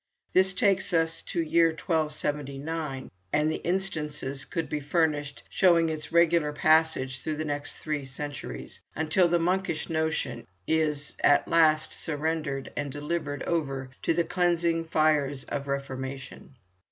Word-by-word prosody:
This 190 +1 +4
takes 190 0 +2
us 165 0 +1
to 170 - -2
the - - -7
year 165 0 +6
1279, 150 -3 -2 0.2
and 155 +1 +1
instances 150 -7 -2
could 165 - -3
be 150 - -2
furnished 145 -1 0
showing 170 -3 +4
its 155 0 -5
regular 170 -2 +4
passage 150 -4 +2
through 155 - -2
the 155 +1 -3
next 145 -1 -4
three 150 -2 -3
centuries, 145 +2 -6
until 160 +3 +3
the 175 0 +3
monkish 175 -1 -1
notion 160 -1 -1 0.2
is 150 -2 0
at 145 - +5
last 155 -2 +3
surrendered 150 -3 -2
and 145 -1 -3
delivered 145 0 -3
over 135 -6 -2
to 165 - +1
the 170 - +3
cleansing 170 -2 +1
fires 150 -4 +2
of 140 -1 -4
the - - -9
Reformation. 135 0 -6
155 Hz, 140 wpm, -28 LUFS, 145-165 Hz, 0.2 s, year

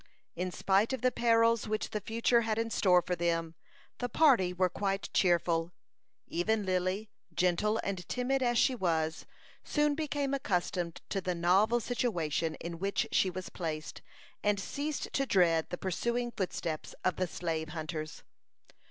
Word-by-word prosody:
In 180 +2 -2
spite 195 +6 +2
of 260 - -4
the 255 - +4
perils 230 -1 +3
which 215 0 -2
the 210 - -2
future 230 +2 +2
had 220 -1 -1
in 225 0 -1
store 180 -4 +4
for 180 - -1
them, 165 -1 -1 0.5
the 245 - -2
party 250 - +4
were 180 0 +2
quite 195 +2 -2
cheerful. 170 -1 +2 0.5
Even 210 +4 0
Lily, 185 +3 -1 0.2
gentle 185 +5 +2
and 190 -3 -4
timid 260 +2 0
as 240 -2 +2
she 260 - +4
was, 165 -7 -1 0.4
soon 295 -1 +1
became 290 -2 -2
accustomed 180 -8 -1
to 195 - -1
the 180 -1 -2
novel 190 +7 +3
situation 170 - -1
in 170 -1 -7
which 195 +1 0
she 190 - +3
was 185 +1 -6
placed, 155 -3 -5 0.4
and 205 -1 +2
ceased 285 +8 -4
to 275 0 0
dread 170 -6 +3
the 180 - -4
pursuing 235 +7 -1
footsteps 170 -6 -4
of 185 - +1
the 185 - 0
slave 160 -2 -3
hunters. 155 -1 -5
190 Hz, 155 wpm, -31 LUFS, 175-230 Hz, 0.5 s, the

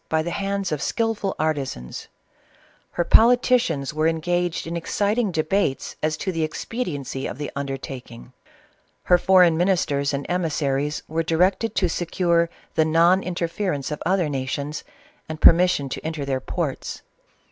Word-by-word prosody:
by 160 0 +1
the 175 - -3
hands 200 -1 -2
of 150 -2 -2
skilful 225 -4 -1
artisans 140 - -3
f - - -37 0.8
her 175 - +1
politicians 230 - +3
were 155 +1 +1
en 165 0 0
gaged 175 +1 -1
in 165 +1 -4
exciting 205 +6 0
debates 160 -3 -1
as 155 0 0
to 190 - -2
the 165 -2 -1
expediency 155 - -4
of - - -6
the 145 0 -5
undertaking: 135 -3 -7 0.7
her 180 - +4
foreign 180 -3 +5
ministers 160 -6 +1
and 140 -1 -3
emissaries 150 -4 -1
were 160 +1 -1
directed 185 +7 +1
to 185 - +2
secure 170 0 +1 0.2
the 160 - +3
non 170 +4 +4
interference 175 -4 -2
of 150 - -4
other 185 -3 +1
nations, 140 +2 -3 0.5
and 155 -1 -5
permission 175 -5 +5
to - - -6
enter 155 -3 -3
their 135 -1 -1
ports. 155 -2 -4
165 Hz, 145 wpm, -23 LUFS, 145-180 Hz, 0.8 s, foreign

